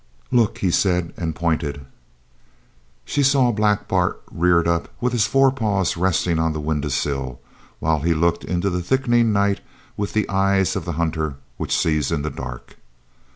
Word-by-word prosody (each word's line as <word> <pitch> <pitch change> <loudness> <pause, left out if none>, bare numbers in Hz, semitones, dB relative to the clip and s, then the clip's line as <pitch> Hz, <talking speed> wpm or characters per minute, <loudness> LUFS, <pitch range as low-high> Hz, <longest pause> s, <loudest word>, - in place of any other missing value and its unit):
"Look!" 120 -4 +2
he 95 - 0
said, 90 -2 +1
and 80 -3 -3
pointed. 80 -4 -2 1.2
She 145 - 0
saw 135 -3 +4
Black 105 -2 +1
Bart - - 0
reared 85 0 +2
up 85 0 0
with 125 0 0
his 110 -3 +2
forepaws 110 -10 +2
resting 90 -1 +1
on 80 -1 +1
the 75 - -4
window 75 -1 -2
sill, 65 -2 -2 0.4
while 80 -1 +1
he 85 +3 +1
looked 85 +2 +1
into 90 +2 -1
the 90 0 -1
thickening 120 +2 +2
night 100 -1 +2 0.4
with 100 -1 -3
the 110 -2 +1
eyes 95 -1 +2
of - - -3
the 85 - -3
hunter 80 -2 -1 0.2
which - - -1
sees 75 -3 +1
in 70 - -1
the 75 - -2
dark. 60 -2 -8
85 Hz, 165 wpm, -22 LUFS, 80-105 Hz, 1.2 s, saw